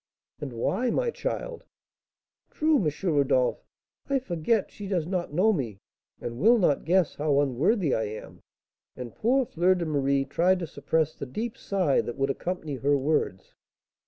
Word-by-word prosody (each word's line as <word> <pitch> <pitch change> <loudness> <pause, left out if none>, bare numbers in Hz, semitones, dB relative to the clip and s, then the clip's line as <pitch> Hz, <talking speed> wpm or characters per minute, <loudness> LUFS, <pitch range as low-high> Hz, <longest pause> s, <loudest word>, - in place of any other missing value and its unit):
"And 145 -3 -5
why, 190 - 0
my 475 - 0
child?" - - -4 0.9
"True, 310 0 +2
M. 155 - +2
Rodolph; 140 -7 +2 0.5
I 275 - +3
forget 205 -2 0
she 205 - -8
does 180 -5 0
not 180 -2 -2
know 190 +8 +3
me, 120 - -3 0.4
and 120 0 -6
will 230 - +6
not 175 -9 +2
guess 180 -1 +2
how 145 -1 +2
unworthy 145 - +1
I 110 - 0
am." 105 +1 -8 0.6
And 125 -3 -7
poor 255 +4 +2
Fleur 180 -1 +2
de 175 -2 -2
Marie 140 -2 +1
tried 185 +5 +2
to 175 - -4
suppress 155 +1 -1
the 140 - -7
deep 220 - -4
sigh 185 -8 +1
that 120 - -6
would 135 0 +1
accompany 160 -2 -4
her 140 +2 +2
words. 135 -9 -1
160 Hz, 160 wpm, -27 LUFS, 140-200 Hz, 0.9 s, will